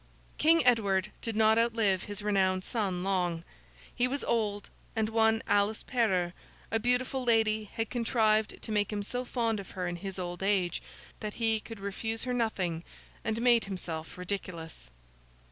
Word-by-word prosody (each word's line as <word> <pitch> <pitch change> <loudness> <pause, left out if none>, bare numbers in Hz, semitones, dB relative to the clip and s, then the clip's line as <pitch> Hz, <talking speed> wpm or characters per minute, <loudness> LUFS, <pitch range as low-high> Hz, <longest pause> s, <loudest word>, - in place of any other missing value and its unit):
King 325 -1 +5
Edward 210 -5 +3
did 225 -2 -3
not 220 +1 +5
outlive 225 -5 +2
his 205 0 -6
renowned 190 -2 +2
son, 190 -6 -1
long. 180 -4 0 0.5
He 245 - +2
was 275 +2 -2
old, 210 -3 -1 0.2
and 220 -1 +1
one 225 0 +3
Alice 205 +2 +2
Perrers, 190 -8 +1 0.4
a 225 - +2
beautiful 250 +2 +1
lady, 220 -2 +3
had 225 +2 -4
contrived 220 -3 +2
to 225 - -3
make 205 -1 +1
him 205 -1 -2
so 245 +4 -3
fond 230 -3 -1
of 195 - -8
her 180 -2 -3
in 175 0 -3
his 195 +1 -6
old 175 -1 -4
age, 190 -3 +1 0.4
that 210 -1 -5
he 225 -1 +2
could 225 0 -10
refuse 220 +3 -3
her 250 - -1
nothing, 185 -8 -1 0.4
and 225 +1 -1
made 240 -2 +5
himself 170 -5 -6
ridiculous. 180 - -5
215 Hz, 160 wpm, -30 LUFS, 190-230 Hz, 0.5 s, King